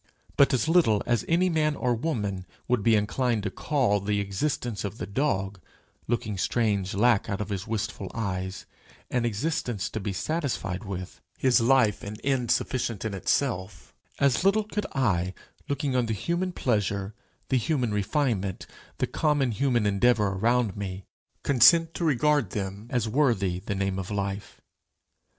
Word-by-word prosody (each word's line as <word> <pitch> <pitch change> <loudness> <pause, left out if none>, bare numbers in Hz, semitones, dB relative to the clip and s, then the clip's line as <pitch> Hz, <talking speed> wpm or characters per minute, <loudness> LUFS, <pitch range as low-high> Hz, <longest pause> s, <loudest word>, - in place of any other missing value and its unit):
But 140 0 +5
as 130 +2 +1
little 160 - +4
as 120 -2 +1
any 175 +3 +3
man 155 -3 +1
or 125 -3 0
woman 105 - -2 0.2
would 125 -3 +2
be 115 +2 +4
inclined 110 +2 0
to 100 - -2
call 125 -8 +1
the 105 +1 -1
existence 100 +3 -2
of 100 +1 -5
the - - -4
dog, 100 -6 -1 0.5
looking 110 -4 -2
strange 100 -1 0
lack 110 0 +3
out 100 - -2
of 105 -1 -4
his 100 0 -4
wistful 105 -3 -3
eyes, 95 -4 -3 0.5
an 125 -2 +1
existence 120 - -2
to 110 - -3
be 100 0 -3
satisfied 110 - -2
with 95 -2 -6 0.2
his 130 -2 +3
life 120 -3 +3
an 105 +1 -7
end 130 -4 0
sufficient 115 -5 0
in 110 - -2
itself, 95 -3 -2 0.2
as 140 -2 +2
little 200 +3 +3
could 210 -1 -3
I, 95 -8 +1 0.3
looking 140 -1 -1
on 125 -2 +2
the 110 - -1
human 175 - -1
pleasure, 105 - -1 0.4
the 130 - +3
human 125 -3 0
refinement, 105 - -1 0.3
the - - +1
common 145 -5 +1
human 120 0 +1
endeavour 105 +1 +3
around 115 +2 +1
me, 95 -1 -5 0.4
consent 160 +6 +5
to - - -4
regard 150 - +2
them 100 +1 -4
as 120 -3 0
worthy 110 -8 +1
the 100 +2 -4
name 95 0 -1
of 95 - -5
life. 100 -1 -4
110 Hz, 160 wpm, -27 LUFS, 100-135 Hz, 0.5 s, But